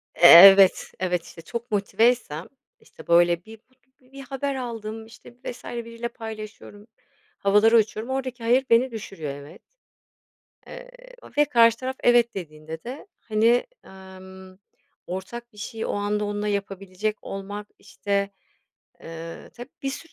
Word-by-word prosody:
E 175 - +7
evet, 195 +2 +9
evet, 180 -2 -1
işte, 165 - -12
çok 235 +7 -7
motiveysem, 205 -5 0 0.3
işte, - - -17
böyle, 175 +1 +3
bir 220 0 -13 0.4
bi 255 +1 -26
bir 275 0 -10
haber 275 +1 -4
aldım, 225 -3 -6
işte, 225 +1 -16
vs. 245 - -7
biriyle 230 0 -6
paylaşıyorum, 215 -2 -10 0.5
havalara 210 +3 +4
uçuyorum, 220 +2 -1
oradaki 255 -2 -4
"hayır" 250 +4 +3
beni 240 +3 +4
düşürüyor. 190 -10 -6
Evet. 145 +1 -13 1.1
Eee, - - -11 0.5
ve 295 - +5
karşı 230 -4 +4
taraf 260 +1 -4
"evet" 240 -2 +4
dediğinde 160 -2 -8
de, 260 +10 -8
hani, 230 +2 +2 0.2
emm, 190 0 -14 0.5
ortak 235 +6 -7
bir 210 - -20
şeyi 220 +2 -6
o - - -3
anda 205 +1 -1
onunla 205 0 -3
yapabilecek 200 +1 -3
olmak, 205 +1 -7
işte, 200 -1 -3 0.7
eee, 165 0 -9
tab 245 +1 -9 0.2
bir 270 - -2
sürü 330 +4 -9
215 Hz, 135 wpm, -24 LUFS, 190-235 Hz, 1.1 s, evet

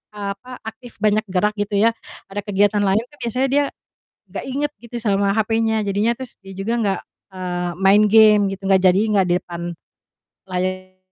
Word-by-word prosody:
eee, 200 -1 -4
apa, 250 - -16 0.2
aktif 225 +2 -9
banyak 215 0 +2
gerak 200 +3 +1
gitu 205 0 -1
ya 220 +3 +4 0.4
ada 205 - -3
kegiatan 205 0 +2
lain 200 +3 +2
kan - - -17
biasanya 250 +3 0
dia 285 +1 +3 0.6
gak - - -6
inget 285 +2 -2
gitu 240 0 -6
sama 200 -3 +1
hapenya, 220 -1 +1
jadinya 205 +3 +1
terus 260 -2 -7
dia 195 - -12
juga 195 +5 -3
gak, 195 -2 0 0.3
eee, 180 -2 -3
main 195 +2 +5
game 215 -1 +7
gitu, 195 0 -6
gak 190 -1 +4
jadinya 195 +2 +4
gak - - -1
di - - +4
depan 170 -1 -9 0.9
layar. 185 0 -3
205 Hz, 180 wpm, -21 LUFS, 195-225 Hz, 0.9 s, game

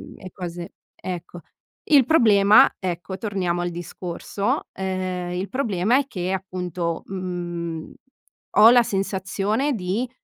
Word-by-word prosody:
e 185 - -10
cose 175 -2 -7 0.2
ecco. 175 -1 -7 0.4
Il 280 -5 +5
problema 215 -8 +6
ecco, 185 +1 -4
torniamo 190 -4 -2
al 175 0 -2
discorso, 175 +3 -3
ehm, 185 -2 -3
il 185 +2 -3
problema 230 -3 +1
è 280 -1 0
che, 180 -6 -3
appunto, 180 -3 -3
mhmm, 175 -3 -5 0.6
ho 215 +2 +9
la 245 0 +6
sensazione 195 +6 -1
di 210 +4 -2
185 Hz, 115 wpm, -23 LUFS, 175-205 Hz, 0.6 s, ho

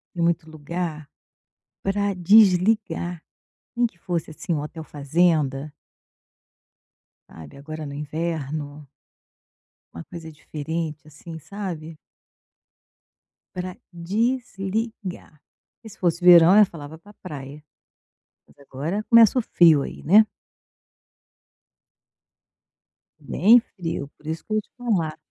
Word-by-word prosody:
E 170 - -3
muito 170 -1 0
lugar 155 0 -5 0.7
pra 200 +1 0
desligar, 185 -2 +3 0.5
nem 240 - +3
que 190 -7 -6
fosse, 170 -2 -3
assim, 165 +3 -6
um 150 - -1
hotel 160 +2 -7
fazenda. 150 -1 0 1.6
Sabe, 80 - -13
agora 155 +2 -7
no 140 - -7
inverno. 150 -1 -4 1.1
Uma 85 - -8
coisa 165 -2 -10
diferente, 155 +1 -5
assim, 160 +2 -10
sabe. 165 -2 -7 1.6
Pra 180 0 -6 0.2
desligar, 200 - -3 0.4
que 225 - -11
se - - -15
fosse 175 -1 0
verão 175 +1 +8
eu 210 - +8
falava 160 -3 -10
pra 205 +6 -18
praia, 145 -5 -9 0.8
mas - - -25
agora 145 +9 -4
começa 230 +1 +7
o - - +1
frio 165 -8 +5
aí, - - -8
né. 210 +7 +6 3.0
Bem 230 +6 +5 0.2
frio, 165 -5 -4
por 150 - -16
isso 160 +1 -4
que 215 - -5
eu 215 - +2
te - - -33
falar 185 -11 -1
170 Hz, 110 wpm, -23 LUFS, 155-195 Hz, 3.0 s, verão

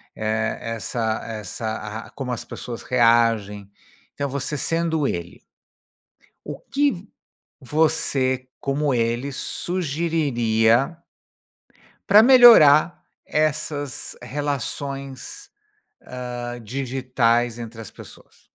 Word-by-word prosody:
eh, 110 +1 -1
essa 115 0 -3
essa 110 0 -5
a - - -16
como 135 -3 -5
as 120 - -4
pessoas 120 -2 -7
reagem. 115 -4 +2 0.4
Então 140 -1 -3
você 140 +2 -3
sendo 165 -1 0
ele 85 -5 -5 1.1
o - - -5
que 285 0 +3
v 180 +2 -10 0.5
você, 130 -3 0
como 140 +1 0
ele, 120 +3 -1
sugeriria 140 -7 0 1.2
pra 210 +2 +8
melhorar 225 - +7 0.2
essas 150 -2 -2
relações, 140 - -5 0.6
hã, 120 -1 -6
digitais 120 -1 -1
entre 115 -1 -8
as 110 - -10
pessoas? - - -15
130 Hz, 90 wpm, -22 LUFS, 115-150 Hz, 1.2 s, pra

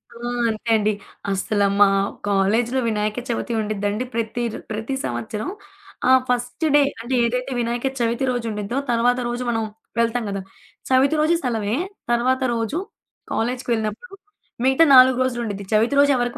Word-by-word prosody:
ఆ! - - -10 0.3
అంతే 220 +1 -4
అండి. 215 -1 +2 0.4
అసలు 200 +1 +1
మా 205 - +8 0.4
కాలేజీలో 215 +6 +2
వినాయక 215 +1 -1
చవితి 235 0 -2
ఉండిద్దండి. 210 +1 -2
ప్రతి 230 +1 -2
ర్ - - -5
ప్రతి 220 +5 -3
సంవత్సరం. 120 - -4 0.6
ఆ - - +6 0.2
ఫస్ట్ 245 +5 -1
డే 295 - +7 0.2
అంటే 245 +3 -2
ఏదైతే 250 +3 -2
వినాయక 240 +2 -1
చవితి 235 +2 0
రోజు 245 -2 -3
ఉండిద్దో, 210 +4 -3
తరువాత 245 +2 +2
రోజు 240 +1 -3
మనం 225 -1 0 0.4
వెళ్తాం 230 +1 +1
కదా! 195 -1 -3 0.5
చవితి 265 +3 +4
రోజు 320 +3 +3
సెలవే. 225 -4 -1 0.4
తరువాత 255 +2 +2
రోజు 230 +8 -2 0.5
కాలేజీకి 245 +3 -2
వెళ్ళినప్పుడు 220 - -4 0.5
మిగతా 265 +5 +5
4 255 0 +8
రోజులు 245 -2 -2
ఉండిద్ది. 200 -3 -4
చవితి 225 +5 +3
రోజు 285 0 +5
ఎవరికి 245 -1 -2
235 Hz, 150 wpm, -22 LUFS, 215-250 Hz, 0.6 s, మా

